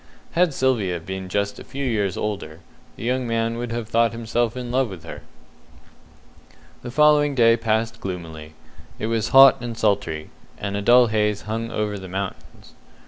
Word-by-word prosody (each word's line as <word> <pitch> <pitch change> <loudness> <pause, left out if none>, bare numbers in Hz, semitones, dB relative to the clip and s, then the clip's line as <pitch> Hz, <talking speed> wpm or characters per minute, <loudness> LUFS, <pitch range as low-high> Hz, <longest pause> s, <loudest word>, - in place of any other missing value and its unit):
Had 175 -1 +2
Sylvia 115 -10 0
been 95 +2 -6
just 100 +1 -2
a - - -9
few 140 +1 -5
years 105 -6 -1
older, 95 -6 -4 0.3
the - - -9
young 125 +1 -1
man 115 0 -1
would 120 -1 -4
have 115 -1 -4
thought 115 0 +2
himself 115 +1 -1
in 125 -1 -5
love 130 -1 +1
with 90 -5 -10
her. 85 - -9 1.6
The - - -7
following 150 +1 +4
day 115 -2 +5
passed 110 -1 -1
gloomily. 80 -4 -7 0.4
It - - -4
was 115 -1 0
hot 135 -1 +7
and 120 -1 -5
sultry, 100 -8 -1 0.3
and 100 0 -4
a 100 - -2
dull 120 +4 +6
haze 105 -2 0
hung 115 +1 -4
over 105 -2 -2
the 95 -1 -9
mountains. 95 +1 -7
115 Hz, 170 wpm, -22 LUFS, 100-120 Hz, 1.6 s, hot